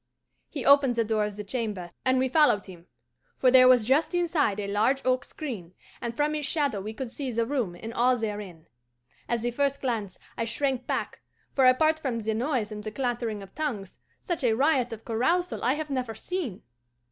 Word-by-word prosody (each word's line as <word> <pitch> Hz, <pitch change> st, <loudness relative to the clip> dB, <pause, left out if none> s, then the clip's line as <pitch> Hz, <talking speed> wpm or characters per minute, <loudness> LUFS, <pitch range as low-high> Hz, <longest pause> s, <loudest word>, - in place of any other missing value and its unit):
"He 280 Hz, -6 st, -5 dB
opened 280 Hz, -3 st, +6 dB
the 230 Hz, -, +2 dB
door 215 Hz, -1 st, 0 dB
of 210 Hz, -1 st, -5 dB
the 210 Hz, -, -6 dB
chamber, 205 Hz, -5 st, -4 dB
and 260 Hz, 0 st, +3 dB
we 260 Hz, +1 st, +2 dB
followed 260 Hz, -7 st, +3 dB
him; 180 Hz, -2 st, -13 dB, 0.5 s
for 255 Hz, -, +4 dB
there 255 Hz, 0 st, +8 dB
was 250 Hz, -4 st, +6 dB
just 290 Hz, +8 st, +2 dB
inside 320 Hz, -, +1 dB
a 205 Hz, -, -2 dB
large 220 Hz, +7 st, +2 dB
oak 255 Hz, 0 st, +2 dB
screen, 205 Hz, -, -7 dB, 0.3 s
and 235 Hz, -1 st, -4 dB
from 295 Hz, +1 st, +1 dB
its 300 Hz, -2 st, -2 dB
shadow 285 Hz, -11 st, 0 dB
we 210 Hz, +3 st, -5 dB
could 235 Hz, +1 st, -6 dB
see 270 Hz, -1 st, -4 dB
the 230 Hz, 0 st, 0 dB
room 235 Hz, -9 st, -2 dB
and 225 Hz, +6 st, -7 dB
all 250 Hz, +2 st, +3 dB
therein. 205 Hz, -7 st, -5 dB, 0.6 s
At 235 Hz, -1 st, 0 dB
the 240 Hz, +1 st, -1 dB
first 280 Hz, +2 st, 0 dB
glance 220 Hz, -8 st, -3 dB, 0.2 s
I 230 Hz, -, +1 dB
shrank 260 Hz, +2 st, -1 dB
back, -, -, -3 dB, 0.3 s
for, 265 Hz, -2 st, +5 dB
apart 310 Hz, +5 st, +4 dB
from 265 Hz, -6 st, -2 dB
the 220 Hz, -1 st, -1 dB
noise 235 Hz, -2 st, -1 dB
and 210 Hz, 0 st, -6 dB
the 215 Hz, -, -3 dB
clattering 235 Hz, -3 st, -2 dB
of 195 Hz, -, -14 dB
tongues, 235 Hz, -12 st, -4 dB, 0.2 s
such 345 Hz, -5 st, -3 dB
a 235 Hz, -3 st, +3 dB
riot 260 Hz, -1 st, +2 dB
of 225 Hz, -1 st, -8 dB
carousal 335 Hz, +11 st, 0 dB
I 255 Hz, -, +3 dB
have 305 Hz, -1 st, -5 dB
never 250 Hz, -4 st, -2 dB
seen. 310 Hz, -, -4 dB
245 Hz, 205 wpm, -27 LUFS, 215-280 Hz, 0.6 s, there